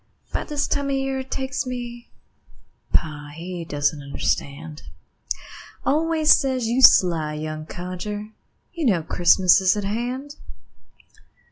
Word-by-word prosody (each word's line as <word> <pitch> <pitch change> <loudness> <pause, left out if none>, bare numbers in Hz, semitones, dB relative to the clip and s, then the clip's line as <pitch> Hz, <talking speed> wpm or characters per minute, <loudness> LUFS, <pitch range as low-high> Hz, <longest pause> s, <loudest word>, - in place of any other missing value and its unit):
'Bout - - -2
this 295 -1 -1
time 280 -1 -1
of - - 0
year 270 0 -1
it 265 0 -7
takes 265 0 -3
me 240 -1 -6 0.8
Pa, 145 -2 -1
he 175 +1 -6
doesn't 145 -1 -1
understand, 140 - -3 1.0
Always 315 +1 +4
says: 260 -3 -1
"You 240 +4 +1
sly 165 -10 +6
young 155 0 -5
codger, 185 +5 -6 0.4
You 330 -5 -1
know 180 -8 +2
Christmas 180 +2 +4
is 185 +2 +3
at 205 - -2
hand." 250 +8 -4
205 Hz, 125 wpm, -23 LUFS, 160-265 Hz, 1.0 s, sly